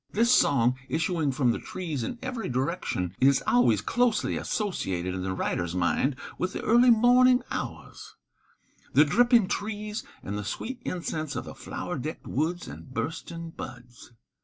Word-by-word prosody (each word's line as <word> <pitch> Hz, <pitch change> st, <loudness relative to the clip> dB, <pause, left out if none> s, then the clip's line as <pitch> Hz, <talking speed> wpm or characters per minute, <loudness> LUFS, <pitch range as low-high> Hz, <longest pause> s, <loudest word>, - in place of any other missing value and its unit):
This 235 Hz, +4 st, +3 dB
song, 130 Hz, -, +3 dB
issuing 160 Hz, -2 st, 0 dB
from 130 Hz, -2 st, +2 dB
the -, -, -2 dB
trees 160 Hz, -8 st, -4 dB
in 240 Hz, -, -4 dB
every 250 Hz, -3 st, -3 dB
direction, 125 Hz, -, -2 dB
is 135 Hz, +1 st, +4 dB
always 120 Hz, -4 st, +4 dB
closely 235 Hz, -, +1 dB
associated 95 Hz, -, -2 dB
in 95 Hz, -, -3 dB
the 95 Hz, 0 st, -2 dB
writer's 85 Hz, -2 st, -2 dB
mind 110 Hz, +10 st, +1 dB, 0.2 s
with 185 Hz, -, -1 dB
the -, -, -4 dB
early 240 Hz, +2 st, +5 dB
morning 245 Hz, +2 st, +6 dB
hours, -, -, -6 dB, 0.8 s
the 150 Hz, -, +7 dB
dripping 235 Hz, -, +4 dB
trees 210 Hz, +1 st, -3 dB, 0.2 s
and 100 Hz, +1 st, -4 dB
the -, -, -4 dB
sweet 245 Hz, -, -5 dB
incense 155 Hz, -4 st, -3 dB
of -, -, -4 dB
the -, -, -8 dB
flower -, -, -5 dB
decked -, -, -6 dB
woods 165 Hz, +6 st, -2 dB
and 130 Hz, -, -10 dB
bursting 165 Hz, +3 st, -4 dB
buds. 120 Hz, -4 st, -10 dB
160 Hz, 155 wpm, -27 LUFS, -, 0.8 s, the